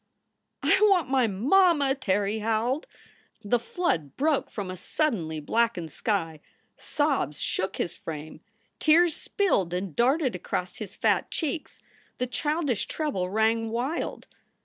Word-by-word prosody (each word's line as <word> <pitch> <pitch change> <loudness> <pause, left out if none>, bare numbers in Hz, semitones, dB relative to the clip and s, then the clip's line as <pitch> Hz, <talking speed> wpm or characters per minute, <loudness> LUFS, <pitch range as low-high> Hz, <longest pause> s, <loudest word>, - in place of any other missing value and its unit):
" - - -54 0.2
"I - - +4
want 360 -8 +3
my 260 -3 +4
mamma!" 285 - +4
Terry 205 -4 0
howled. 225 +6 0 0.6
The 235 +4 +2
flood 165 - -2
broke 300 0 +1
from 195 -4 -5
a - - -5
suddenly 185 - -1
blackened 180 -1 0
sky. 165 -7 -1 0.4
Sobs 275 - -1
shook 190 - -1
his 170 - -2
frame. 155 0 -8 0.4
Tears 325 +1 +5
spilled 195 - 0
and 180 -3 -4
darted 265 +3 +2
across - - -4
his - - -7
fat - - +1
cheeks. 315 -1 -3 0.4
The 250 - 0
childish 290 -1 -1
treble 270 - -2
rang 220 +2 +1
wild. 250 +8 -3
230 Hz, 130 wpm, -27 LUFS, 185-295 Hz, 0.6 s, Tears